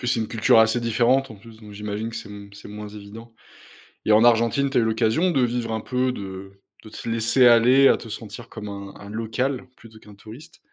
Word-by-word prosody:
plus, 120 Hz, -, -5 dB
c'est 120 Hz, -, +1 dB
une 110 Hz, -, -3 dB
culture 115 Hz, 0 st, +3 dB
assez 110 Hz, +2 st, +2 dB
différente 120 Hz, +4 st, +1 dB
en -, -, -9 dB
plus, 110 Hz, +2 st, -16 dB
donc, 105 Hz, -1 st, -13 dB
j'imagine 105 Hz, +2 st, -5 dB
que 115 Hz, -, -8 dB
c'est 110 Hz, -2 st, -8 dB
m 100 Hz, 0 st, -10 dB
c'est 100 Hz, -, -12 dB
moins 105 Hz, 0 st, -8 dB
évident. 105 Hz, +3 st, -12 dB, 0.7 s
Et 110 Hz, -, +3 dB
en 110 Hz, -, +5 dB
Argentine, 120 Hz, +4 st, +3 dB
tu 135 Hz, -, -1 dB
as 120 Hz, -, +4 dB
eu -, -, +1 dB
l'occasion 110 Hz, +10 st, +1 dB
de 135 Hz, -, +1 dB
vivre 120 Hz, -2 st, -1 dB
un 110 Hz, -, -3 dB
peu, 125 Hz, +1 st, -1 dB
de 95 Hz, -1 st, -8 dB, 0.3 s
de -, -, -10 dB
te 110 Hz, -, -8 dB
laisser 115 Hz, +3 st, +3 dB
aller 125 Hz, +4 st, +6 dB
à -, -, +3 dB
te -, -, -11 dB
sentir 115 Hz, +2 st, -9 dB
comme 105 Hz, -1 st, -9 dB
un 100 Hz, -1 st, -8 dB
un 100 Hz, -, -12 dB
local 115 Hz, +5 st, -3 dB
plutôt 110 Hz, -1 st, -16 dB
qu'un 105 Hz, -1 st, -16 dB
touriste. 110 Hz, +9 st, -14 dB
115 Hz, 235 wpm, -23 LUFS, 105-120 Hz, 0.7 s, aller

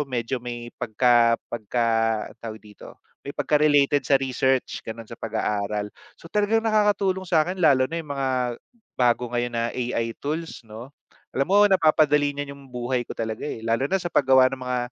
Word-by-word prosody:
medyo 125 Hz, 0 st, -2 dB
may 120 Hz, -1 st, -7 dB
pagka 115 Hz, 0 st, +3 dB, 0.2 s
pagka 120 Hz, +1 st, -1 dB, 0.6 s
tawag 110 Hz, -2 st, -6 dB
dito, 105 Hz, -2 st, -14 dB, 0.2 s
may 140 Hz, -, -9 dB
pagka-related 145 Hz, -1 st, +3 dB
sa 140 Hz, -, +6 dB
research 130 Hz, 0 st, 0 dB
gano'n 115 Hz, 0 st, -8 dB
sa 115 Hz, -, -9 dB
pag-aaral. 105 Hz, -2 st, -2 dB, 0.2 s
So -, -, -22 dB
talagang 215 Hz, +2 st, +1 dB
nakakatulong 205 Hz, -4 st, +1 dB
sa'kin 180 Hz, +2 st, +1 dB
lalo 135 Hz, -5 st, +5 dB
na 165 Hz, +4 st, -3 dB
'yung 155 Hz, -, -12 dB
mga 135 Hz, -1 st, -1 dB, 0.7 s
bago 120 Hz, 0 st, +2 dB
ngayon 120 Hz, 0 st, -1 dB
na 115 Hz, -, 0 dB
AI 120 Hz, -2 st, -2 dB
tools 160 Hz, +1 st, -4 dB
'no, 115 Hz, +4 st, -11 dB, 0.4 s
alam 135 Hz, +1 st, 0 dB
mo 205 Hz, +2 st, +6 dB
napapadali 155 Hz, -6 st, +3 dB
niyan 145 Hz, -1 st, -4 dB
'yung 140 Hz, 0 st, -14 dB
buhay 125 Hz, 0 st, -2 dB
ko -, -, -7 dB
talaga, 110 Hz, 0 st, -4 dB
eh, 110 Hz, -, -6 dB
lalo 115 Hz, +5 st, 0 dB
na 195 Hz, -, +2 dB
sa 175 Hz, -2 st, -5 dB
paggawa 130 Hz, -1 st, +5 dB
ng 130 Hz, -, -5 dB
mga 125 Hz, 0 st, -2 dB
130 Hz, 170 wpm, -24 LUFS, 115-150 Hz, 0.7 s, sa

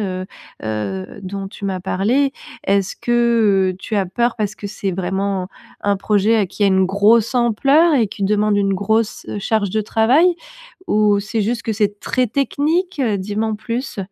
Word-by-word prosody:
heu 185 Hz, -2 st, -3 dB, 0.4 s
heu, 105 Hz, -, -4 dB
dont 195 Hz, +1 st, -5 dB
tu 200 Hz, -, -10 dB
m'as 190 Hz, -2 st, -2 dB
parlé. 235 Hz, +10 st, +1 dB, 0.3 s
Est-ce 195 Hz, -1 st, +1 dB
que, 230 Hz, -6 st, +2 dB
heu, -, -, -12 dB
tu 215 Hz, -, -4 dB
as 195 Hz, -, +2 dB
peur 235 Hz, +6 st, 0 dB
parce 210 Hz, 0 st, -1 dB
que 205 Hz, -, -7 dB
c'est 200 Hz, -1 st, -3 dB
vraiment, 190 Hz, +1 st, -2 dB, 0.3 s
un 200 Hz, 0 st, +1 dB
projet 205 Hz, +1 st, +2 dB
qui 210 Hz, -, -5 dB
a -, -, +5 dB
une 190 Hz, -1 st, +3 dB
grosse 210 Hz, +5 st, +3 dB
ampleur 275 Hz, +7 st, +3 dB
et 230 Hz, -5 st, +3 dB
qui 200 Hz, 0 st, -7 dB
demande 210 Hz, +1 st, +2 dB
une 195 Hz, -1 st, +1 dB
grosse 220 Hz, +3 st, -1 dB
charge 205 Hz, -2 st, 0 dB
de 220 Hz, -, 0 dB
travail 240 Hz, -, +3 dB, 0.6 s
ou 210 Hz, -1 st, +3 dB
c'est 215 Hz, +2 st, -3 dB
juste 230 Hz, +3 st, -1 dB
que 225 Hz, -, -2 dB
c'est 205 Hz, -1 st, -1 dB
très 255 Hz, -1 st, 0 dB
technique? 305 Hz, -, 0 dB, 0.2 s
Dis 205 Hz, +2 st, -5 dB
m'en 220 Hz, 0 st, 0 dB
plus. 235 Hz, +1 st, -5 dB
210 Hz, 175 wpm, -19 LUFS, 195-230 Hz, 0.6 s, a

